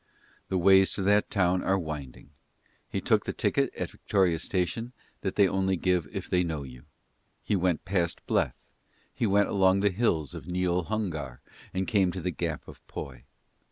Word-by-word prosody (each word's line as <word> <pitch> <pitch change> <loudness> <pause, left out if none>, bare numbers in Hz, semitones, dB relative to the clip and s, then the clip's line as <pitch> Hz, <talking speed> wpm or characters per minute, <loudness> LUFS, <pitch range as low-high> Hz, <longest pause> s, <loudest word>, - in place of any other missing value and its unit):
The 95 - 0
ways 95 +1 +5
to 100 - -2
that 105 +2 +3
town 90 -2 +2
are 95 - +2
winding; 75 -5 -7 0.6
he - - -2
took - - +2
the - - -2
ticket - - +1
at - - -4
Victoria 90 -5 +1
Station 100 +8 -2 0.3
that 95 - -2
they 100 -2 +5
only 95 0 +1
give 90 -3 +1
if 95 -1 -5
they 90 -1 +2
know 80 -4 -3
you: 65 -2 -12 0.6
he 105 - 0
went 90 -3 0
past 90 -3 -1
Bleth: - - 0 0.5
he 115 - 0
went 100 0 +3
along 95 0 +3
the 100 0 +3
Hills 90 - 0
of - - -8
Neol 90 -1 0
Hungar 85 - -3 0.3
and 95 0 -1
came 95 -4 +3
to 95 - -4
the 90 +1 -2
Gap - - -3
of - - -12
Poy. 65 -3 -8
95 Hz, 180 wpm, -28 LUFS, 85-95 Hz, 0.6 s, ways